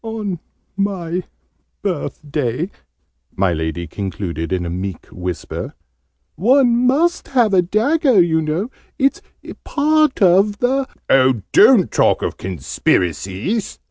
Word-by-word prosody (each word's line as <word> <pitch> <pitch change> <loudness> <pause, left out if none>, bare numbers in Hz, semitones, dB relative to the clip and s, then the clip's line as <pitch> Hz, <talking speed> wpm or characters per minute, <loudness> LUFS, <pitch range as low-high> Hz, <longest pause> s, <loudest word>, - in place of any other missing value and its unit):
"On 215 -6 -4 0.4
my 185 -3 -2 0.6
birthday," 150 - -3 0.6
my 95 -2 +1
Lady 80 +2 -3
concluded 85 -2 -5
in 90 -2 -1
a - - -3
meek 95 0 -5
whisper. 90 -1 -5 0.6
"One 245 - +3
must 330 +7 +1
have 240 -6 +2
a 185 - +5
dagger, 235 - +2
you 165 -2 +3
know. 160 +10 -2 0.3
It's 275 +1 +1 0.4
part 305 -1 +2
of 195 +2 +4
the 260 +4 0
" - - -42
"Oh, 130 -5 +4
don't - - +6
talk - - +2
of - - -3
Conspiracies!" 95 - -2
180 Hz, 115 wpm, -19 LUFS, -, 0.6 s, don't